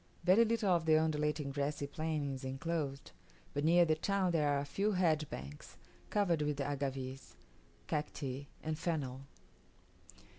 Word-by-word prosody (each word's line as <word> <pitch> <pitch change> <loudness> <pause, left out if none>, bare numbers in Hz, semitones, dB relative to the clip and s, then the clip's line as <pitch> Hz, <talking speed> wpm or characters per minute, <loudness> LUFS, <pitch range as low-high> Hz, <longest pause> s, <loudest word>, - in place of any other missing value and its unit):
Very 185 +6 +6
little 220 -3 +1
of 170 -2 +2
the 155 -1 +6
undulating 150 -2 0
grassy 140 +1 -1
plain 150 -1 -2
is 130 - -7
enclosed; 140 +1 -3 0.4
but 145 - -1
near 170 +2 +6
the 160 - +3
town 190 +3 +1
there 155 -3 +2
are 145 - +2
a 140 - -2
few 200 +8 0
hedge 160 -5 +2
banks, 70 +2 -8 0.3
covered 180 -7 +2
with 150 -1 -1
agaves, 135 -2 -3 0.5
cacti, 140 -2 -3 0.2
and 155 0 -2
fennel. 140 -6 -2
150 Hz, 145 wpm, -35 LUFS, 140-170 Hz, 0.5 s, Very